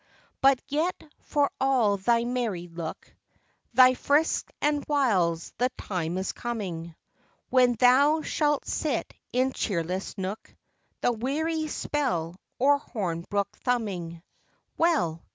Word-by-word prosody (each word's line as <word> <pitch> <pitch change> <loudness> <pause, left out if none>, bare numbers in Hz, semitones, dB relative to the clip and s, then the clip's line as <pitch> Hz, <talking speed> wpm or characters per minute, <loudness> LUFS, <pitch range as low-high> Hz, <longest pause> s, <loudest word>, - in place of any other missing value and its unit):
But 270 -1 +5
yet, 315 +6 -1 0.2
for 290 -1 0
all 250 -7 +3
thy 230 +4 +2
merry 235 -8 -2
look, 165 -1 -7 0.6
Thy 255 0 +8
frisks 290 +5 +1
and 295 0 +1
wiles, 195 - +1
the 250 +1 +3
time 175 -2 -3
is 190 - -2
coming, 180 -9 -5 0.6
When 250 -1 +5
thou 280 +6 +5
shalt 295 -2 0
sit - - -2 0.2
in 255 +1 +1
cheerless 185 +1 -2
nook, 195 +3 -5 0.5
The - - +3
weary 310 +7 -1
spell 240 - -2 0.2
or 285 +3 +4
hornbook 200 -3 -3
thumbing. 185 -9 -2 0.5
Well! 175 - +1
240 Hz, 115 wpm, -27 LUFS, 180-280 Hz, 0.6 s, Thy